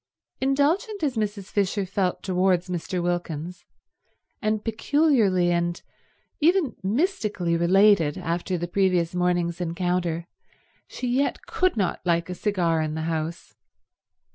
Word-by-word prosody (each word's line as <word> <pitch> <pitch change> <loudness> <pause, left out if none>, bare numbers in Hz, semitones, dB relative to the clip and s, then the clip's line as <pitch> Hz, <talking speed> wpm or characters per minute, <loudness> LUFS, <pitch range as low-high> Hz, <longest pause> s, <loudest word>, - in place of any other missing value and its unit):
Indulgent 310 - +1
as 275 -4 0
Mrs. 205 -2 -3
Fisher 200 0 0
felt 185 -1 -1
towards 185 -1 +1
Mr. 180 0 -3
Wilkins, 175 0 -3 0.8
and 215 0 -1
peculiarly 225 - +2
and 170 0 0 0.6
even 325 - +2
mystically 210 - 0
related 175 -2 +4
after 175 +2 -2
the 175 +1 -3
previous 180 -2 +1
morning's 175 -1 0
encounter, 170 -1 -1 0.6
she 250 - -5
yet 260 +4 0
could 370 -8 0
not 195 -4 0
like 170 0 0
a - - -2
cigar 175 -5 0
in 155 0 -2
the 160 - -3
house. 160 +1 -4
185 Hz, 120 wpm, -25 LUFS, 170-215 Hz, 0.8 s, related